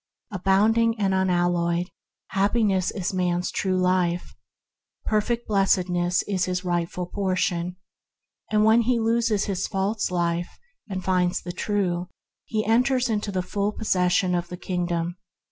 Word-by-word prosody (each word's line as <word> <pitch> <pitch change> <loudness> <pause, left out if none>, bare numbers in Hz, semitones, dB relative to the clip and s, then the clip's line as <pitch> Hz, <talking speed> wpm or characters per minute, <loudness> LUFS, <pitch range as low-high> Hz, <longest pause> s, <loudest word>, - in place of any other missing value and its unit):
Abounding 215 +4 +2
and 195 -2 +1
unalloyed 175 -2 +1 0.4
Happiness 195 -2 +1
is 190 -1 -3
man's 180 -1 0
true 185 -1 0
life; 180 -1 +1 0.7
perfect 230 +2 0
Blessedness 180 -3 +2
is 190 -3 -1
his 180 0 -3
rightful 175 0 -1
portion; 180 -2 -1 0.7
and 215 0 +3
when 220 +2 +5
he 240 +1 +1
loses 225 -2 +1
his 195 -1 -2
false 200 +3 -1
life 175 -1 -1 0.3
and 190 -2 -4
finds 180 -1 +1
the 175 - -5
true 180 -3 -1 0.4
he 215 -1 -2
enters 250 +2 +2
into 210 -1 -1
the 185 -2 -1
full 200 +3 -1
possession 180 -3 +1
of 175 -1 -1
his 180 - -6
Kingdom. 175 -1 -2
185 Hz, 130 wpm, -25 LUFS, 180-210 Hz, 0.7 s, when